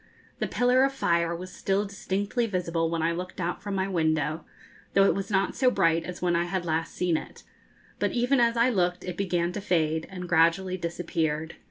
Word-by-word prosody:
The -, -, 0 dB
pillar 250 Hz, +1 st, +3 dB
of 270 Hz, 0 st, +2 dB
fire 170 Hz, -8 st, +1 dB
was 185 Hz, +2 st, -8 dB
still 195 Hz, +3 st, 0 dB
distinctly 200 Hz, +4 st, -2 dB
visible 170 Hz, -4 st, -1 dB
when 165 Hz, -1 st, -1 dB
I 165 Hz, -, +2 dB
looked 180 Hz, +2 st, -5 dB
out 175 Hz, 0 st, -2 dB
from 200 Hz, 0 st, -4 dB
my 190 Hz, 0 st, 0 dB
window, 160 Hz, -3 st, 0 dB, 0.5 s
though 195 Hz, 0 st, +6 dB
it -, -, +4 dB
was 195 Hz, 0 st, -4 dB
not 195 Hz, -2 st, +1 dB
so 255 Hz, -, +4 dB
bright 165 Hz, -7 st, +2 dB
as 180 Hz, 0 st, -7 dB
when 175 Hz, -1 st, +2 dB
I 170 Hz, +1 st, +1 dB
had 175 Hz, 0 st, -2 dB
last 160 Hz, 0 st, -2 dB
seen 175 Hz, -3 st, +1 dB
it; -, -, -9 dB, 0.6 s
but -, -, +1 dB
even 245 Hz, +2 st, +2 dB
as 235 Hz, 0 st, +3 dB
I 235 Hz, +2 st, +4 dB
looked 180 Hz, -4 st, 0 dB
it 180 Hz, -2 st, -5 dB
began 175 Hz, -2 st, 0 dB
to 205 Hz, -, -5 dB
fade, 160 Hz, -4 st, 0 dB
and 180 Hz, -2 st, -7 dB
gradually 175 Hz, +2 st, +3 dB
disappeared. 165 Hz, -2 st, -2 dB
180 Hz, 205 wpm, -27 LUFS, 165-195 Hz, 0.6 s, though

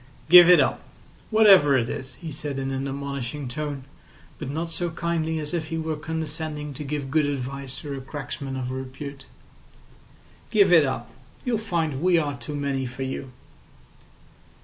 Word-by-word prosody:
"Give 175 Hz, 0 st, +10 dB
it 180 Hz, -, +8 dB
up—whatever 195 Hz, -, +3 dB
it 115 Hz, -2 st, 0 dB
is," 130 Hz, +1 st, -6 dB
he 165 Hz, -3 st, -8 dB
said 145 Hz, -1 st, -4 dB
in 135 Hz, 0 st, -2 dB
an 135 Hz, +1 st, -2 dB
admonishing 140 Hz, 0 st, -4 dB
tone, 145 Hz, +1 st, -4 dB, 0.6 s
but 150 Hz, -, -5 dB
not 165 Hz, +4 st, -3 dB
so 175 Hz, +1 st, -2 dB
kindly 160 Hz, -1 st, -1 dB
as 150 Hz, 0 st, -4 dB
if 160 Hz, -2 st, -2 dB
he 165 Hz, 0 st, -3 dB
were 160 Hz, -1 st, -2 dB
condescending 155 Hz, -1 st, -4 dB
to 145 Hz, -, -6 dB
give 140 Hz, -1 st, -4 dB
good 155 Hz, -1 st, +3 dB
advice 140 Hz, -1 st, -4 dB
to 145 Hz, -2 st, -5 dB
a 135 Hz, -, -6 dB
cracksman 135 Hz, -1 st, -6 dB
of 125 Hz, -1 st, -3 dB
repute. 135 Hz, +1 st, -7 dB, 1.2 s
"Give 200 Hz, -4 st, +5 dB
it 160 Hz, -4 st, +7 dB
up. 120 Hz, -2 st, -4 dB, 0.3 s
You'll 240 Hz, -4 st, +1 dB
find 165 Hz, -9 st, -1 dB
we 180 Hz, 0 st, +4 dB
are 145 Hz, -3 st, 0 dB
too 145 Hz, +2 st, -7 dB
many 140 Hz, -2 st, -1 dB
for 125 Hz, +2 st, -5 dB
you." 130 Hz, 0 st, -4 dB
145 Hz, 165 wpm, -25 LUFS, 135-160 Hz, 1.2 s, Give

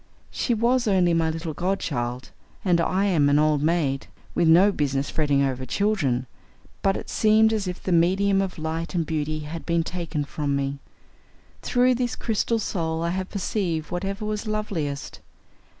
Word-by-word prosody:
She 240 Hz, -, 0 dB
was 240 Hz, +2 st, +2 dB
only 180 Hz, -4 st, +3 dB
my 165 Hz, -1 st, +2 dB
little 160 Hz, 0 st, -4 dB
godchild, 135 Hz, -9 st, -2 dB, 0.3 s
and 175 Hz, -2 st, +3 dB
I 185 Hz, +4 st, +1 dB
am 160 Hz, -8 st, +3 dB
an 145 Hz, -, +4 dB
old 150 Hz, -1 st, +3 dB
maid, 150 Hz, -4 st, 0 dB, 0.3 s
with 170 Hz, -, +2 dB
no 180 Hz, +6 st, +6 dB
business 140 Hz, -5 st, -1 dB
fretting 145 Hz, -3 st, +2 dB
over 130 Hz, -1 st, -1 dB
children, 140 Hz, -, 0 dB, 0.6 s
but 195 Hz, 0 st, +2 dB
it -, -, -7 dB
seemed 220 Hz, 0 st, +4 dB
as 210 Hz, -3 st, -1 dB
if 180 Hz, 0 st, -5 dB
the 185 Hz, -, -2 dB
medium 190 Hz, +4 st, +3 dB
of 190 Hz, -2 st, -3 dB
light 160 Hz, +2 st, -3 dB
and 165 Hz, -2 st, +1 dB
beauty 155 Hz, 0 st, -2 dB
had 155 Hz, +2 st, -6 dB
been 170 Hz, -1 st, +1 dB
taken 165 Hz, -4 st, -3 dB
from 140 Hz, 0 st, -2 dB
me. 140 Hz, 0 st, -2 dB, 0.8 s
Through 250 Hz, +1 st, +3 dB
this 245 Hz, -1 st, -1 dB
crystal 225 Hz, +1 st, 0 dB
soul 165 Hz, -6 st, -2 dB
I 170 Hz, -, 0 dB
had 185 Hz, +1 st, -3 dB
perceived 180 Hz, -6 st, -2 dB
whatever 195 Hz, +4 st, -3 dB
was 215 Hz, +1 st, -3 dB
loveliest. 175 Hz, -10 st, -3 dB
170 Hz, 165 wpm, -24 LUFS, 150-200 Hz, 0.8 s, no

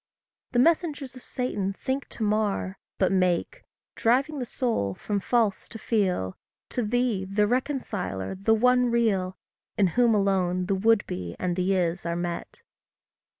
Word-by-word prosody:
The -, -, +1 dB
messengers 290 Hz, -2 st, +2 dB
of 255 Hz, -, -10 dB
Satan 205 Hz, -8 st, -2 dB
think 265 Hz, +7 st, -3 dB
to 225 Hz, -, -5 dB
mar, 210 Hz, -2 st, 0 dB, 0.2 s
But 190 Hz, -, +2 dB
make 185 Hz, -, +1 dB, 0.3 s
driving 270 Hz, +6 st, +1 dB
the 250 Hz, -, -3 dB
soul 220 Hz, -, -1 dB
from 205 Hz, -, -2 dB
false 220 Hz, -1 st, 0 dB
to 225 Hz, -, -7 dB
feal 185 Hz, -, 0 dB, 0.3 s
To 245 Hz, -, -1 dB
thee, 235 Hz, -2 st, 0 dB
the 195 Hz, +2 st, +1 dB
reconciler, 225 Hz, -, -2 dB
the 200 Hz, +4 st, +2 dB
one 250 Hz, +2 st, +4 dB
real, 200 Hz, -6 st, +1 dB, 0.4 s
In 195 Hz, -3 st, +4 dB
whom 240 Hz, -2 st, +4 dB
alone 185 Hz, -3 st, +1 dB
the 195 Hz, -, 0 dB
would 215 Hz, +2 st, +3 dB
be 90 Hz, -1 st, -5 dB
and 180 Hz, -1 st, -1 dB
the 185 Hz, +2 st, +1 dB
is 175 Hz, -1 st, 0 dB
are 170 Hz, -, -1 dB
met. 175 Hz, 0 st, -5 dB
210 Hz, 150 wpm, -26 LUFS, 185-245 Hz, 0.4 s, one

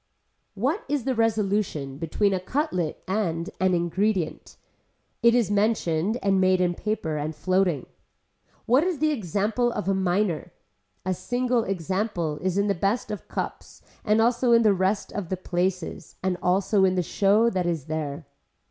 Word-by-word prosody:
What 270 Hz, -, -1 dB
is 290 Hz, -3 st, 0 dB
the 265 Hz, -, 0 dB
resolution 205 Hz, -, 0 dB
between 195 Hz, +5 st, +1 dB
a 190 Hz, -, 0 dB
cutlet 185 Hz, -, -2 dB
and 185 Hz, -3 st, -1 dB
an 185 Hz, -1 st, +3 dB
ingredient. 175 Hz, +1 st, -1 dB, 0.6 s
It 235 Hz, 0 st, +5 dB
is 230 Hz, -5 st, +2 dB
mentioned 205 Hz, -2 st, +1 dB
and 195 Hz, -1 st, +3 dB
made 185 Hz, 0 st, +4 dB
in 180 Hz, -1 st, +2 dB
paper 175 Hz, -6 st, -2 dB
and 150 Hz, +1 st, -3 dB
floating. 185 Hz, -5 st, +1 dB, 0.8 s
What 255 Hz, +6 st, +4 dB
is 360 Hz, -3 st, 0 dB
the 310 Hz, +2 st, +2 dB
example 220 Hz, -, 0 dB
of 210 Hz, -4 st, -4 dB
a 195 Hz, -, +3 dB
miner. 190 Hz, -2 st, 0 dB, 0.5 s
A 185 Hz, -, +1 dB
single 245 Hz, +4 st, 0 dB
example 185 Hz, -3 st, -2 dB
is 185 Hz, +1 st, -1 dB
in 200 Hz, -, +2 dB
the 200 Hz, -, +2 dB
best 200 Hz, +5 st, -1 dB
of 210 Hz, -, -6 dB
cups -, -, -6 dB, 0.2 s
and 215 Hz, 0 st, +3 dB
also 235 Hz, +1 st, +3 dB
in 230 Hz, 0 st, +6 dB
the 210 Hz, -2 st, +5 dB
rest 190 Hz, +2 st, 0 dB
of 195 Hz, -5 st, -4 dB
the 185 Hz, -, -1 dB
places 180 Hz, 0 st, -3 dB
and 185 Hz, -1 st, +1 dB
also 190 Hz, +2 st, +2 dB
in 185 Hz, -1 st, +3 dB
the 180 Hz, -, +1 dB
show 210 Hz, +6 st, +3 dB
that 185 Hz, -2 st, -1 dB
is 165 Hz, -5 st, -2 dB
there. 155 Hz, -1 st, -4 dB
195 Hz, 165 wpm, -25 LUFS, 175-220 Hz, 0.8 s, in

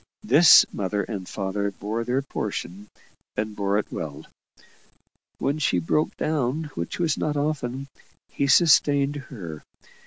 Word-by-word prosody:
This 155 Hz, +5 st, +7 dB
mother 100 Hz, +1 st, -2 dB
and 95 Hz, -3 st, -6 dB
father 100 Hz, 0 st, -2 dB
bore 105 Hz, +4 st, -4 dB
their 125 Hz, +3 st, -1 dB
portion, 100 Hz, -6 st, -5 dB, 0.5 s
and 105 Hz, 0 st, -2 dB
bore 100 Hz, 0 st, 0 dB
it 105 Hz, -, -3 dB
well. -, -, -6 dB, 1.1 s
When 145 Hz, +3 st, -1 dB
she 140 Hz, -11 st, +1 dB
broke 90 Hz, -, 0 dB
down, 150 Hz, 0 st, -1 dB
which 85 Hz, -, -4 dB
was 165 Hz, -4 st, 0 dB
not 150 Hz, -1 st, -1 dB
often, 140 Hz, -3 st, -2 dB, 0.4 s
he 140 Hz, -, -2 dB
sustained 145 Hz, -1 st, +4 dB
her. 95 Hz, -, -8 dB
125 Hz, 130 wpm, -24 LUFS, 100-145 Hz, 1.1 s, This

